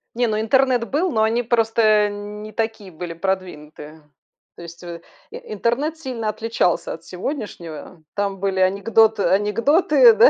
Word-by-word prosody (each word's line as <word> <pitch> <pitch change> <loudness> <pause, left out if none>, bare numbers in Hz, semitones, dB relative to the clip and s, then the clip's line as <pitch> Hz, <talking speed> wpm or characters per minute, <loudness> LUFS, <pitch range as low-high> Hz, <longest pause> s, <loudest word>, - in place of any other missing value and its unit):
Не, 240 0 +1
ну 215 -1 0
интернет 250 +1 +2
был, 325 +7 +1
но 220 -4 +2
они 225 +2 +2
просто, 230 -1 +1
э, 215 -1 +4
не 205 +1 -7
такие 220 -3 -3
были 170 +1 -6
продвинутые. 160 -4 -5 0.6
То - - -10
есть, 170 +1 -11
э, 170 -1 -8 0.3
и - - -8 0.2
интернет 250 +10 -1
сильно 255 -8 -5
отличался 215 -4 0
от 165 0 -11
сегодняшнего. 180 - -6
Там 200 -1 -2
были 190 0 -1
анекдот 210 +4 +3
анекдоты, 280 - +4
да. 460 +3 +7
215 Hz, 150 wpm, -21 LUFS, 185-235 Hz, 0.6 s, да